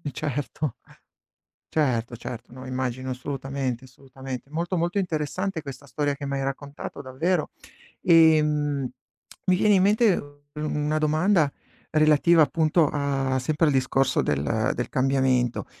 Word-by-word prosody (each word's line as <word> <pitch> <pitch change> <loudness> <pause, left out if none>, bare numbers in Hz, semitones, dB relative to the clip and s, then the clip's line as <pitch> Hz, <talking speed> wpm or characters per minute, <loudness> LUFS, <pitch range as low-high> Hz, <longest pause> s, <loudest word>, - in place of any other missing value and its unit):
Certo. 145 -1 -3 1.0
Certo, 120 -6 0
certo, 120 +1 -8
no, 130 +1 -9
immagino, 130 0 -3
assolutamente, 130 -1 -4
assolutamente. 130 +1 -9
Molto, 170 +4 -2
molto 175 +4 0
interessante 175 +1 -2
questa 140 0 -9
storia 145 +2 -1
che 140 - -7
m'hai 140 0 -2
raccontato, 140 +2 -5
davvero. 155 +6 -1 0.5
Ehm, 150 -5 +4 0.6
mi 185 -1 +4
viene 205 +1 +4
in 185 - +4
mente 210 0 +4
u 145 -1 -7
una 150 0 -1
domanda 155 0 +2 0.4
relativa, 155 +2 +5
appunto, 155 +1 +2
a 135 -2 -1
sempre 155 +5 +1
al 150 - +3
discorso 130 0 +2
del 70 -1 0
del - - -2
cambiamento. 130 -2 +1
145 Hz, 125 wpm, -25 LUFS, 130-155 Hz, 1.0 s, relativa